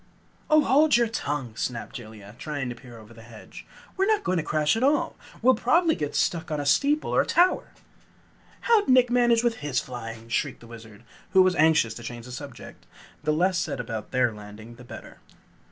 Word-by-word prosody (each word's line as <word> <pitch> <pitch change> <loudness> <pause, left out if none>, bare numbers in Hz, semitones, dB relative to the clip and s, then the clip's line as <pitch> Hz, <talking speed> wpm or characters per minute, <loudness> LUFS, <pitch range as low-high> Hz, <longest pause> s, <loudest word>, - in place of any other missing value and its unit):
"Oh, 310 0 +6
hold 295 +1 +4
your 240 - +3
tongue!" 145 - -4
snapped 120 0 -4
Jellia, 110 -4 -10
trying 145 -4 -4
to 120 - -6
peer 120 -1 -13
over 110 +1 -14
the 115 - -14
hedge. 115 -1 -13 0.3
"We're 385 0 +1
not 430 -1 +2
going 185 - 0
to 165 - -1
crash 155 +4 +1
at 225 - -2
all! 285 +3 +1 0.3
We'll 260 +2 +6
probably 320 +9 +2
get 150 -3 -4
stuck 165 -2 0
on 150 -1 -2
a 145 - -3
steeple 285 - +2
or - - +4
tower!" 360 +2 +2 0.9
"How'd 450 - +2
Nick 255 -1 +5
manage 240 -1 +3
with 235 -1 0
his 145 -3 -1
flying?" 115 -2 -8
shrieked 115 - -2
the - - -13
Wizard, 115 -2 -13 0.3
who 190 -1 +7
was 185 0 +2
anxious 155 -8 +3
to 120 - -10
change 120 0 -8
the 125 - -10
subject. 140 0 -10 0.4
The 150 - +1
less 175 +4 +1
said - - -3
about 110 -3 -5
their 125 -3 +1
landing 105 +2 -11
the 120 +1 -14
better. 120 - -11
145 Hz, 200 wpm, -25 LUFS, -, 0.9 s, who